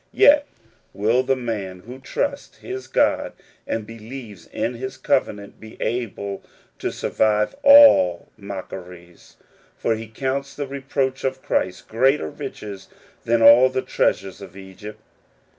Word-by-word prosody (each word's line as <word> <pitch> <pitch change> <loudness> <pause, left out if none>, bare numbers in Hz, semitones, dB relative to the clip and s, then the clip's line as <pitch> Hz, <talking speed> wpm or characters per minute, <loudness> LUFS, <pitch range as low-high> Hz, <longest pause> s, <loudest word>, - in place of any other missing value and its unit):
Yet 290 -6 +5 0.5
will 115 +5 +2
the 130 +1 +1
man 105 -7 -5
who 125 +6 -11
trusts 280 - -4
his 385 0 -7
God - - +1 0.3
and 110 -2 -3
believes 115 -4 -10
in 120 - -3
his 130 +2 -6
covenant, 100 -5 -1
be 110 0 -13
able 100 -5 -3 0.4
to - - -2
survive 105 -1 0
all 280 - +7
mockeries; 90 -3 -10 0.4
for 115 - 0
he 110 0 -6
counts 135 +4 -3
the 145 - -3
reproach 135 -1 -3
of 130 0 -2
Christ 90 0 -2
greater 125 - +1
riches 100 -2 -8 0.4
than 115 0 +2
all 120 +3 +8
the 130 0 -2
treasures 95 0 -1
of 100 0 -11
Egypt. 95 +2 -10
115 Hz, 130 wpm, -22 LUFS, 100-130 Hz, 0.5 s, all